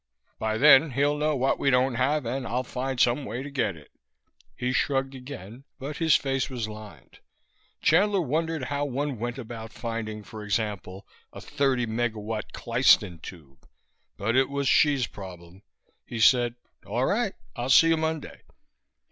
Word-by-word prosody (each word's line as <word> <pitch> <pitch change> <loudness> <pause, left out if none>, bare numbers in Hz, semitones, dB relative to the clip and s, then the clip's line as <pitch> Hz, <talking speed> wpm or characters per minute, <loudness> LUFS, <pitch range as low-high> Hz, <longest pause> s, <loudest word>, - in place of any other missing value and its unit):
By 110 0 -1
then 145 +1 +6
he'll 145 +3 +2
know 150 0 0
what 135 0 +1
we 140 - +2
don't 130 0 +3
have, 130 +3 0
and 125 +3 -3
I'll 125 +2 -1
find 130 0 -4
some 125 +4 +3
way 120 +3 -5
to 145 - -8
get 130 -9 -1
it." 75 -2 -16 0.6
He 125 +1 -2
shrugged 135 0 0
again, 125 -3 -9
but 145 +2 -6
his 160 -2 +4
face 135 -1 0
was 120 -4 -3
lined. 105 -6 -12 0.6
Chandler 200 +5 +4
wondered 160 -1 -1
how 140 +3 -2
one 140 -2 -2
went 120 +2 -3
about 115 -2 -8
finding, 110 -2 -5
for 105 +1 -9
example, 100 -2 -3 0.3
a - - -10
thirty 135 -4 0
megawatt 110 -1 -3
klystron 115 -7 +2
tube; 70 -9 -13 0.5
but 110 +4 -1
it 135 0 +3
was 140 -1 -2
Hsi's 140 -3 +4
problem. 90 -2 -11 0.5
He 120 - -5
said: 120 +1 +4 0.3
"All 125 +2 -1
right, 205 - 0 0.2
I'll 120 0 -3
see 165 +5 +7
you 165 - +3
Monday." 160 -1 -3
125 Hz, 160 wpm, -26 LUFS, 110-140 Hz, 0.6 s, see